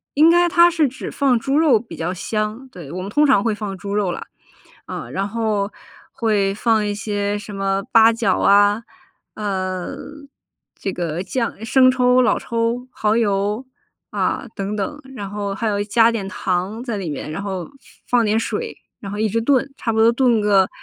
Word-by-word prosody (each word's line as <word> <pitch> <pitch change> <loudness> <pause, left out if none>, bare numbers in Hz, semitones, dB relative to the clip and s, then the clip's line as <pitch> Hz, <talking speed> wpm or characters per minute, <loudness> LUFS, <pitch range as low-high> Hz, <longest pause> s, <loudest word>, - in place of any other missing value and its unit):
应 310 +3 +6
该 345 0 +4
它 340 0 +6
是 320 -5 +1
只 265 - -7
放 265 -5 +2
猪 275 +3 0
肉 290 -9 +5
比 230 - -10
较 175 +3 -3
香， 215 +6 -3
对， 170 - -10
我 180 - -5
们 195 - -5
通 295 +7 +3
常 265 -8 +4
会 220 -1 0
放 200 -2 -5
猪 200 +2 -5
肉 200 -4 +1
啦， - - -5 0.6
啊， - - -6
然 195 +1 -2
后 215 -2 -1 0.4
会 205 -4 +1
放 220 -1 +1
一 205 - -1
些 205 0 -2
什 205 0 -9
么 195 0 -1
八 225 0 +7
角 225 -4 +1
啊， 205 +2 +4 0.5
呃， 190 +3 -3 0.8
这 195 - -3
个 170 -1 -3
酱 230 +1 -3
生 255 +3 +5
抽， 255 0 +3
老 240 -4 +2
抽， 235 +2 -2
蚝 215 -1 0
油 205 +3 0 0.4
啊 - - -1
等 200 +1 -3
等， 250 +9 -4 0.2
然 200 -3 -6
后 205 -1 -3
还 225 +2 -2
有 205 -1 0
加 225 +2 +4
点 200 -4 -3
糖 195 +4 -2
在 235 -4 -3
里 185 -5 -4
面， 150 +1 -5
然 180 - -4
后 190 -3 -4
放 - - -16 0.5
放 - - +2
点 215 +1 +1
水， 450 - -3 0.2
然 200 -5 -7
后 - - -4
一 220 - +1
直 230 +3 0
炖， 270 +2 +2
差 225 - -2
不 220 - -1
多 225 +1 +6
炖 235 -3 +3
个 195 -2 +3
215 Hz, 205 characters per minute, -20 LUFS, 200-240 Hz, 0.8 s, 八